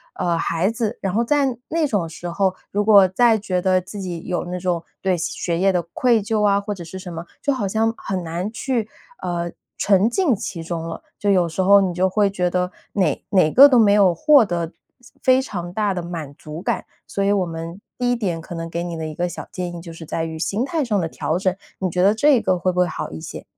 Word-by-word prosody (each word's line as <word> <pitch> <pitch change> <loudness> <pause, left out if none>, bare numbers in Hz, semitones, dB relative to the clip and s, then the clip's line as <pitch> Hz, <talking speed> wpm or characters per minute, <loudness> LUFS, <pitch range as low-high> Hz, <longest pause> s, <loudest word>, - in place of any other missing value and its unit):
呃， 170 -1 0
孩 165 +3 0
子。 225 0 -2
然 190 -2 -2
后 230 +3 +2
在 270 -1 +1
那 320 -1 +1
种 205 -10 0
时 170 +2 -7
候， 190 +2 0 0.2
如 205 +1 +1
果 200 -3 +7
再 225 +4 +4
觉 185 -3 -2
得 185 0 +3
自 195 +3 -9
己 175 -3 -5
有 180 -1 -2
那 180 +1 -4
种 175 -2 -1 0.2
对 190 -2 +1
学 170 0 -2
业 195 +1 +4
的 180 -2 +1
愧 240 -3 +3
疚 215 0 0
啊， 200 -1 +4
或 205 +1 -4
者 185 -4 -8
是 170 +3 -8
什 185 -1 -8
么， 165 +1 -6 0.2
就 285 - +1
好 215 -7 -2
像 220 +3 +1
很 190 -2 -3
难 170 +5 -3
去， 230 -2 -2 0.3
呃， 170 -1 -2 0.3
沉 200 +2 +3
浸 295 - +2
其 170 -3 -5
中 165 0 -4
了。 165 - -7 0.2
就 205 - 0
有 180 -3 +3
时 165 - -2
候 200 +2 +7
你 185 -2 0
就 185 +2 +1
会 205 +1 +2
觉 180 -2 0
得 180 0 -1 0.2
哪 195 -3 0
哪 185 -6 +4
个 275 - +9
都 255 - +5
没 205 -3 +5
有 200 -4 +5
获 290 - +6
得 170 -3 -2 0.5
非 260 0 +4
常 175 -9 -5
大 210 -1 0
的 180 - -3
满 165 -5 -6
足 155 +3 -8
感。 - - -2 0.2
所 200 - -2
以 200 - +2
我 195 -3 +2
们 165 +3 -7 0.2
第 245 0 +1
1 - - +2
点 190 -8 -2
可 170 - -8
能 165 0 -5
给 170 +1 -3
你 175 -1 -4
的 160 - -4
一 155 - -6
个 175 +2 -1
小 - - -8
建 175 -1 -4
议 170 - -7
就 170 0 -9
是 165 0 -10
在 160 - -2
于 160 -1 -6
心 200 +7 -1
态 320 +1 -1
上 210 -4 +1
的 170 - -1
调 160 +1 -2
整， 185 0 0 0.2
你 185 - 0
觉 180 +1 0
得 200 +3 +5
这 270 +1 +4
个 190 -3 +1
会 185 +2 0
不 180 - -2
会 180 - +4
好 160 - -5
一 80 - -7
些？ - - -8
185 Hz, 265 characters per minute, -21 LUFS, 170-210 Hz, 0.5 s, 个